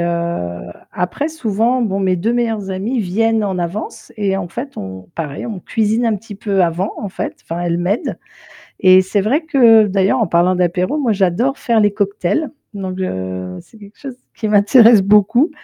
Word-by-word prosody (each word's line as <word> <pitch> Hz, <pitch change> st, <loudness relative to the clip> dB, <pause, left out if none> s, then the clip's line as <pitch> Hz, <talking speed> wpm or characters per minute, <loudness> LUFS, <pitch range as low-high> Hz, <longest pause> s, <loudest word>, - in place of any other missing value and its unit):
heu, 170 Hz, -, -3 dB, 0.2 s
après 180 Hz, -, -2 dB
souvent, 240 Hz, -4 st, 0 dB
bon 200 Hz, -4 st, -1 dB
mes 185 Hz, -1 st, +1 dB
2 215 Hz, +7 st, -1 dB
meilleurs 225 Hz, -5 st, -1 dB
amis 220 Hz, +7 st, -2 dB
viennent 220 Hz, +3 st, +1 dB
en 190 Hz, -2 st, -2 dB
avance 175 Hz, +5 st, -5 dB
et 200 Hz, -2 st, 0 dB
en 190 Hz, -2 st, -4 dB
fait, 245 Hz, +10 st, -7 dB
on 95 Hz, -1 st, -8 dB
pareil, 150 Hz, +1 st, -5 dB
on 210 Hz, -5 st, -6 dB
cuisine 220 Hz, +4 st, 0 dB
un 220 Hz, -2 st, +1 dB
petit 210 Hz, +1 st, -11 dB
peu 200 Hz, -1 st, -1 dB
avant 175 Hz, +3 st, 0 dB
en 205 Hz, -, -4 dB
fait, 190 Hz, -, -5 dB
enfin, 165 Hz, +1 st, -5 dB
elles 170 Hz, 0 st, -1 dB
m'aident 185 Hz, +6 st, -2 dB, 0.6 s
et 185 Hz, -1 st, +6 dB
c'est 190 Hz, +2 st, -1 dB
vrai 250 Hz, -, +1 dB
que 235 Hz, -9 st, +5 dB
d'ailleurs 195 Hz, +5 st, +1 dB
en 225 Hz, -, +1 dB
parlant 175 Hz, +2 st, +2 dB
d'apéro, 180 Hz, -, 0 dB
moi 255 Hz, -6 st, +1 dB
j'adore 200 Hz, +8 st, 0 dB
faire 235 Hz, -2 st, +1 dB
les 205 Hz, -1 st, +3 dB
cocktails. 205 Hz, -, -1 dB, 0.2 s
Donc 190 Hz, -2 st, -5 dB
heu, 95 Hz, -, -4 dB
c'est 225 Hz, -, -20 dB
quelque 205 Hz, 0 st, -15 dB
chose 270 Hz, -3 st, -8 dB, 0.2 s
qui 220 Hz, -, -3 dB
m'intéresse 215 Hz, +1 st, +6 dB
beaucoup. 210 Hz, -, +3 dB
200 Hz, 185 wpm, -17 LUFS, 180-225 Hz, 0.6 s, et